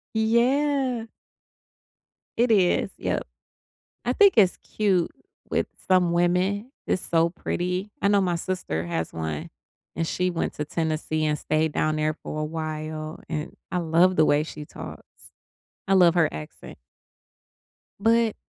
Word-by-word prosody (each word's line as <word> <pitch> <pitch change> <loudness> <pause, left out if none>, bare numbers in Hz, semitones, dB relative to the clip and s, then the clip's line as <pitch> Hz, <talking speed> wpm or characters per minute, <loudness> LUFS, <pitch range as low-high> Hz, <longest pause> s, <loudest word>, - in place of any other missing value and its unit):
Yeah. 250 +2 +2 1.3
It 240 0 +3
is, 190 -5 +3
yep. - - -2 0.8
I 245 - +1
think 400 +5 +6
it's 190 -4 +5
cute 190 -5 0 0.4
with - - 0 0.2
some 180 -2 +4
women, 180 +6 +1
it's 185 - 0
so 165 0 +2
pretty. 180 +3 -3
I - - +3
know 200 0 +4
my 180 -2 +1
sister 165 - -3
has 80 -1 -2
one, 80 -2 -4 0.5
and 165 -1 -1
she 180 +2 0
went 170 -2 -2
to 150 - -3
Tennessee, 155 0 -1
and 150 0 +1
stayed 155 +1 0
down 155 0 +1
there 155 0 +1
for 155 0 -6
a - - -1
while, 155 0 -5
and 155 -1 -4 0.2
I 180 - 0
love 170 +2 +3
the 155 - +5
way 145 0 +3
she 150 -1 -8
talks. - - -9 0.8
I 195 - +3
love 180 -2 +6
her 165 -3 +4
accent. 75 0 -9 1.2
But, 225 +1 +3
175 Hz, 145 wpm, -25 LUFS, 155-200 Hz, 1.3 s, think